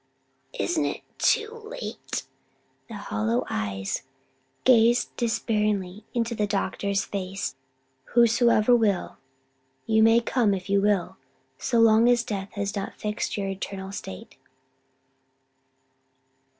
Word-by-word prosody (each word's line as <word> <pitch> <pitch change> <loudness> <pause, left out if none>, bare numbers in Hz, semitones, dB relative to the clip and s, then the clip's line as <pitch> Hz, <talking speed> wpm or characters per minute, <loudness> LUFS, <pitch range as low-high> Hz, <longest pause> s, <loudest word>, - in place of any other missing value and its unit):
'" - - -44
"Isn't 340 -3 0
it - - -3 0.2
too 450 +1 +1
late?" - - -5 0.6
The 230 - -8
hollow 115 - -1
eyes 100 -2 -2 0.6
gazed 240 -1 +4
despairingly 210 -4 -1
into 235 0 0
the 210 -2 0
doctor's 200 0 -1
face. 190 -7 -4 0.6
"'Whosoever 235 0 +5
will': 210 -6 0 0.7
you 220 -1 +3
may 225 +1 +6
come 230 -3 +1
if 190 +1 -6
you 200 0 +4
will; 195 -2 +1 0.4
so 240 - 0
long 225 +1 +6
as 240 -1 +3
death 200 -4 -5
has 200 -1 -3
not 200 -1 -4
fixed 210 0 -3
your 200 -1 -2
eternal 195 0 -5
state." 95 - -8
210 Hz, 115 wpm, -26 LUFS, 195-235 Hz, 0.7 s, may